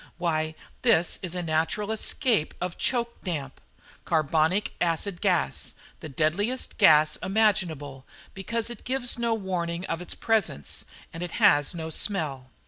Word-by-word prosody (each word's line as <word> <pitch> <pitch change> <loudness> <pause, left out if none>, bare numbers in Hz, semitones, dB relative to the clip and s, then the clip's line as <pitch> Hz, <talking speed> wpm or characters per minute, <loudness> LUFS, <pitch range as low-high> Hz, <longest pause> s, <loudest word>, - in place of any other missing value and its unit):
"Why, 160 -2 -1 0.3
this 225 -9 +3
is 180 -1 -4
a 180 - -2
natural 165 +7 0
escape 220 - 0
of 180 -1 -3
choke 235 -2 -1
damp. 145 -8 -4 0.4
Carbonic 160 +5 +1
acid 175 +2 0
gas 185 -5 0 0.2
the 155 - -8
deadliest 175 - -1
gas 155 -6 +6
imaginable, 175 -10 0 0.3
because 230 +4 -2
it 240 - -9
gives 250 -2 0
no 235 -1 +1
warning 180 -3 -3
of 165 -1 -3
its 180 - -2
presence, 215 - 0 0.3
and 165 - -7
it 175 -1 -4
has 145 +3 +4
no 160 -1 -5
smell. 150 -9 -1
175 Hz, 135 wpm, -26 LUFS, 155-210 Hz, 0.4 s, gas